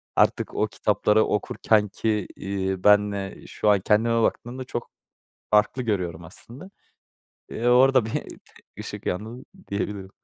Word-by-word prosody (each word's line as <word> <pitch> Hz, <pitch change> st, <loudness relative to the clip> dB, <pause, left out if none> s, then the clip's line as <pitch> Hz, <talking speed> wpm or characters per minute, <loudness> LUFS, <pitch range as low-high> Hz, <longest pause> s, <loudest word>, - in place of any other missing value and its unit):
artık -, -, +1 dB
o -, -, +1 dB
kitapları 110 Hz, +1 st, +2 dB
okurken 105 Hz, 0 st, +1 dB
ki, 105 Hz, -1 st, -1 dB
iii, 95 Hz, -1 st, -3 dB
benle 105 Hz, -1 st, +2 dB
şu 105 Hz, -, 0 dB
an 100 Hz, -1 st, +5 dB
kendime 115 Hz, +4 st, +2 dB
baktığımda 125 Hz, +3 st, -2 dB
çok 120 Hz, -2 st, -6 dB, 0.6 s
farklı 105 Hz, +5 st, +3 dB
görüyorum 90 Hz, -7 st, -2 dB
aslında. 120 Hz, -, -11 dB, 0.8 s
Eee, 120 Hz, -, -3 dB
orada 130 Hz, -1 st, +5 dB
bir 110 Hz, -, -5 dB, 0.7 s
ışık -, -, -7 dB
yandı, 110 Hz, +8 st, -4 dB, 0.2 s
diyebilirim. 100 Hz, -1 st, -4 dB
105 Hz, 125 wpm, -24 LUFS, 100-115 Hz, 0.8 s, an